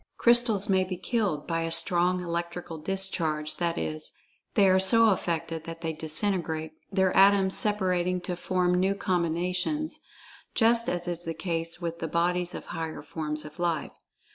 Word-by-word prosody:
Crystals 235 -4 +3
may 190 -2 +3
be 185 -1 -5
"killed" 195 -7 -1
by 165 -1 -1
a 165 - -2
strong 180 +2 +3
electrical 170 -1 -4
discharge—that 170 -3 +1
is, 80 -1 -4 0.4
they 200 - +5
are 190 0 +4
so 225 +3 +5
affected 165 -3 -2
that 165 0 -8
they 165 -1 -2
disintegrate, 160 0 0 0.2
their 190 -1 +1
atoms 195 0 +5
separating 185 -3 0
to 180 0 -4
form 180 0 0
new 190 +2 +1
combinations, 180 - -1 0.6
just 235 0 +3
as 175 0 -2
is 175 -1 -3
the 165 -2 -4
case 165 -1 -3
with 170 -1 -5
the 165 - -3
"bodies" 175 +2 -1
of - - -7
higher 160 -2 -5
forms 150 -1 -2
of 150 +3 -11
life. 170 -3 -1
175 Hz, 155 wpm, -27 LUFS, 165-190 Hz, 0.6 s, they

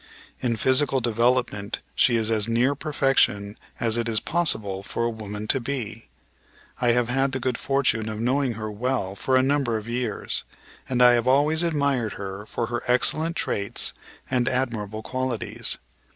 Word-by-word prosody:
In 120 -2 0
physical 130 +4 +2
development 115 -3 0
she 120 - +4
is 115 -1 +1
as 110 -1 +3
near 120 +4 +2
perfection 135 -8 +1 0.2
as 115 -1 +3
it 115 0 -1
is 110 -1 +2
possible 110 - 0
for 110 +3 -3
a 120 - 0
woman 105 -1 -6
to 135 - +5
be. 120 - -5 0.7
I 120 -1 +2
have 120 -1 +1
had 135 +2 +1
the 130 - -1
good 125 -1 -1
fortune 120 -6 0
of 110 0 -5
knowing 130 +2 +1
her 110 -1 -5
well 110 -3 -2
for 130 +6 0
a 130 - +5
number 135 -4 +1
of 110 +1 -8
years, 120 -3 -2 0.5
and 125 -1 +3
I 125 - +8
have 120 0 +1
always 145 +5 +3
admired 140 -9 0
her 100 +1 -7
for 120 - -2
her 120 0 -3
excellent 155 +7 +2
traits 100 -9 0 0.3
and 125 -1 +1
admirable 110 -4 -2
qualities. 130 -3 -1
120 Hz, 165 wpm, -24 LUFS, 110-130 Hz, 0.7 s, I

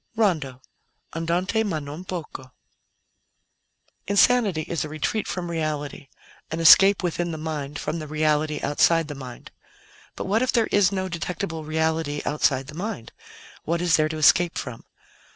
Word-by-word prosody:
RONDO 155 - 0 0.5
ANDANTE 175 +7 0
MA 195 -7 -2
NON 150 +3 -7
POCO 150 -8 -7 1.6
Insanity 200 -4 +3
is 165 +1 -3
a 155 - -6
retreat 155 +8 -2
from 175 -2 -4
reality, 150 -3 -4 0.4
an 160 - -4
escape 195 +4 +7
within 175 0 -1
the 160 - -5
mind 150 -2 -5
from 160 +2 -3
the 155 - -7
reality 155 0 0
outside 165 +3 +2
the 150 - -6
mind. 130 -3 -10 0.6
But - - -5
what 210 +4 +1
if 255 - +1
there 230 -2 +2
is 200 -1 +4
no 190 -1 -2
detectable 170 -1 -4
reality 160 -1 -1
outside 135 -3 +1
the 150 - -11
mind? 175 - -5 0.5
What 170 +1 -1
is 175 -2 +3
there 155 0 +2
to 155 - -4
escape 170 +3 +4
from? 125 -4 -6
160 Hz, 150 wpm, -24 LUFS, 150-180 Hz, 1.6 s, escape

